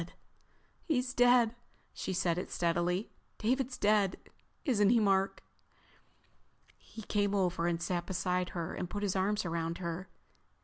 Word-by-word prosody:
"He's 250 -6 0
dead." 245 -2 +5 0.4
She - - -4
said 180 -2 +1
it - - -5
steadily. 175 +3 0 0.3
"David's 255 +3 0
dead, 205 -2 +2 0.5
isn't 210 -8 +3
he, 235 +1 +5
Mark?" 195 -2 +1 1.3
He 220 - -12
came 205 0 0
over 180 -3 +1
and 170 -1 0
sat 175 0 -2
beside 180 -1 -1
her 170 +1 -3
and 180 - -4
put 205 +2 -4
his 195 -2 0
arms 200 +2 +1
around 165 0 -2
her. 175 +1 -5
190 Hz, 135 wpm, -32 LUFS, 175-215 Hz, 1.3 s, dead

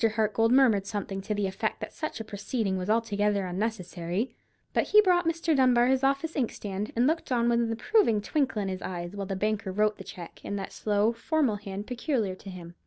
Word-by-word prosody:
Hartgold 225 +1 +2
murmured 235 -7 +4
something 200 -2 -3
to 210 +2 -3
the 205 -1 0
effect 190 0 -2
that - - -6
such 310 -6 -4
a - - -3
proceeding 210 -1 -2
was 185 +1 -3
altogether 210 -3 +1
unnecessary; 185 +1 -3 0.4
but - - +2
he 425 - +6
brought 355 -4 +3
Mr. 330 -1 +1
Dunbar 250 -3 +5
his 260 +1 +2
office 275 +4 +1
inkstand, 210 -6 -3
and 240 +2 +3
looked 320 0 0
on 235 -1 +2
with 235 0 +3
an 230 -1 0
approving 230 - +3
twinkle 260 -1 0
of - - -3
his 185 -1 -4
eyes 175 +1 -5
while 200 -1 -4
the 195 - -2
banker 205 0 -1
wrote 210 +2 +1
the - - -7
cheque, 175 -5 -10
in 200 - -4
that 195 -1 -5
slow, 210 +1 +1
formal 250 -2 0
hand 200 0 -6
peculiar 245 - -1
to 190 +1 -11
him. 175 -2 -9
215 Hz, 210 wpm, -28 LUFS, 195-250 Hz, 0.4 s, he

